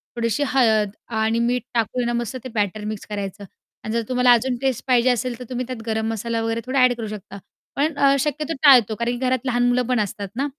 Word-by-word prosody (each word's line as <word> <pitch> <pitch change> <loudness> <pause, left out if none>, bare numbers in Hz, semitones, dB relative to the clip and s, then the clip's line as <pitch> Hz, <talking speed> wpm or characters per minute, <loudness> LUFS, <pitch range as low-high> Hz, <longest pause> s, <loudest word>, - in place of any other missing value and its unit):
थोडीशी 230 +3 0
हळद 220 -6 +3 0.3
आणि 220 +1 +1
मीठ 240 0 0
टाकून 240 +1 0
ना 240 - -1
मस्त 240 +1 -3
ते 260 - -6
बॅटर 210 0 -1
मिक्स 215 -1 -5
करायचं 200 0 -5 0.4
आणि 215 - -4
जर 230 - +1
तुम्हाला 250 -1 +4
अजून 245 +2 +1
टेस्ट 265 -3 -1
पाहिजे 250 0 +4
असेल, 245 0 -1
तर - - -6
तुम्ही 250 -1 -3
त्यात 255 -3 -6
गरम 220 0 -1
मसाला 230 +1 -2
वगैरे 225 0 -2
थोडा 265 +1 0
अ‍ॅड 255 -1 +5
करू 225 -2 -4
शकता. 205 -1 -8 0.4
पण 305 +3 +1
अ, 275 -1 +4
शक्यतो 300 +3 -2
टाळतो 245 -7 +6
कारण 235 +2 -1
की 260 - -2
घरात 255 0 0
लहान 245 -1 +1
मुलं 245 +1 +2
पण 250 -2 +1
असतात 205 -1 -3
ना 275 +4 -1
240 Hz, 225 wpm, -22 LUFS, 220-255 Hz, 0.4 s, टाळतो